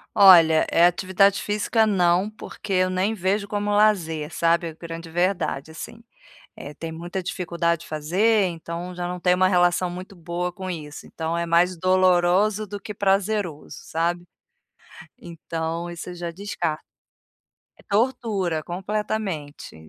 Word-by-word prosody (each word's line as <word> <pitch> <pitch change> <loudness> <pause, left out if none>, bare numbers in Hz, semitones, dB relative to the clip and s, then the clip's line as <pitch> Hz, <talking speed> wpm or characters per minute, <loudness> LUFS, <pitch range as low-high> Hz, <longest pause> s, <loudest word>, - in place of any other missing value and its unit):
Olha, 170 -6 +7
eh, 170 - +5
atividade 190 +2 +2
física 215 +2 +1
não, 185 -1 +2
porque 215 -1 -7
eu 185 0 +3
nem 185 +4 0
vejo 200 +1 -1
como 205 0 -2
lazer, 175 -7 +1
sabe, 170 0 +2
a 160 - -7
grande 165 +1 -8
verdade, 175 -4 -1
assim. 230 +8 -9 0.5
Eh, 145 - -9
tem 165 +2 -6
muita 175 +3 -5
dificuldade 170 -2 -1
de - - -12
fazer, 190 +8 +2
então, 170 +1 -5
já 175 0 -4
não 180 0 -5
tem 180 +1 +3
uma 185 +1 +3
relação 180 -1 +2
muito 185 +2 -8
boa 175 +1 -4
com 185 0 -6
isso, 150 -4 -7
então 160 0 -4
é 170 0 -1
mais 175 +2 +3
doloroso 185 +3 +3
do 205 +1 -6
que 210 +1 -7
prazeroso, 195 -4 -1
sabe. 170 +2 -1 1.0
Então, 165 -1 -5
isso 170 +1 -7
eu 180 - -7
já 175 -1 -5
descarto. 170 -4 -4 1.0
É - - -15
tortura, 205 -7 0
completamente, 190 -3 -4
180 Hz, 145 wpm, -23 LUFS, 170-200 Hz, 1.0 s, Olha